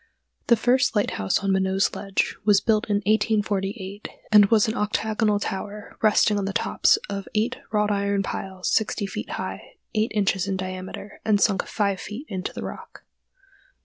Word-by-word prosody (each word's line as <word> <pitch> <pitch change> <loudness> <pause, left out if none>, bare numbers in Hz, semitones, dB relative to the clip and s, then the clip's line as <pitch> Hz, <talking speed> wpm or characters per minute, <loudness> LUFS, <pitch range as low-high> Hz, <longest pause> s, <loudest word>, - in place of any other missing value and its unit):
The 235 - +6
first 245 +2 +2
lighthouse 100 - +1
on 195 - +1
Minot's 190 0 +1
Ledge 195 -1 -1
was 205 -1 +5
built 215 0 +1
in 205 0 +1
1848, 205 -1 0 0.2
and 210 -1 +8
was 220 0 +4
an 220 - -1
octagonal 215 -1 0
tower 205 +1 -5
resting 210 -1 +4
on 195 - -2
the 195 - -3
tops - - +3
of 200 -1 -5
eight 235 +5 +1
wrought 210 -1 +1
iron 200 0 0
piles 190 -1 -5
sixty 215 -1 +1
feet 195 - -6
high, - - -6 0.2
eight 220 0 +1
inches 195 -2 +1
in 195 -1 -1
diameter, 185 +2 -7
and 210 -2 +3
sunk 200 -3 +2
five 200 -3 0
feet 210 - -7
into 185 -2 -4
the - - -7
rock. - - -9
205 Hz, 165 wpm, -24 LUFS, 195-215 Hz, 0.2 s, and